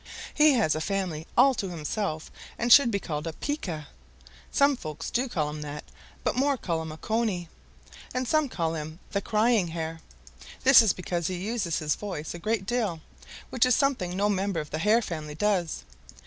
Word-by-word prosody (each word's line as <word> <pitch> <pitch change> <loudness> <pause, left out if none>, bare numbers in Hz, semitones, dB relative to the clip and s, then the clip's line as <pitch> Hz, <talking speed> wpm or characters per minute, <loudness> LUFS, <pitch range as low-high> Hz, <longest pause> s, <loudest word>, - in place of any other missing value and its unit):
He 300 -1 +6
has 220 -11 +3
a 155 - -2
family 180 -4 -2
all 270 0 +7
to 200 -6 -3
himself 160 0 -3 0.3
and 240 0 +5
should 280 -4 +8
be 205 - 0
called 155 -3 -4
a 165 - -3
Pika. 175 - -4 0.7
Some 280 0 +4
folks 155 - -6
do 250 +2 0
call 150 -8 -1
him 150 0 -6
that, 150 0 -6 0.4
but - - 0
more 275 +2 +2
call 165 -7 -2
him 160 -1 -6
a 155 - -8
Cony, 215 -5 -1 0.6
and 255 0 -2
some 310 -1 +2
call 165 -6 -1
him 155 0 -5
the 200 - 0
Crying 215 -3 +2
Hare. 165 0 -4 0.6
This 265 -2 +9
is 220 -4 +4
because 175 -2 -3
he 185 - -2
uses 195 -2 -2
his 150 -1 0
voice 185 -7 -5
a 175 - -7
great 215 +2 -1
deal, 215 -8 -1 0.5
which 250 - +2
is 250 -2 +5
something 230 -11 0
no 205 +1 +2
member 195 -3 0
of 150 -1 -6
the 155 - -2
Hare 215 +6 +3
family 155 -5 -5
does. 180 - 0
185 Hz, 190 wpm, -27 LUFS, 160-235 Hz, 0.7 s, This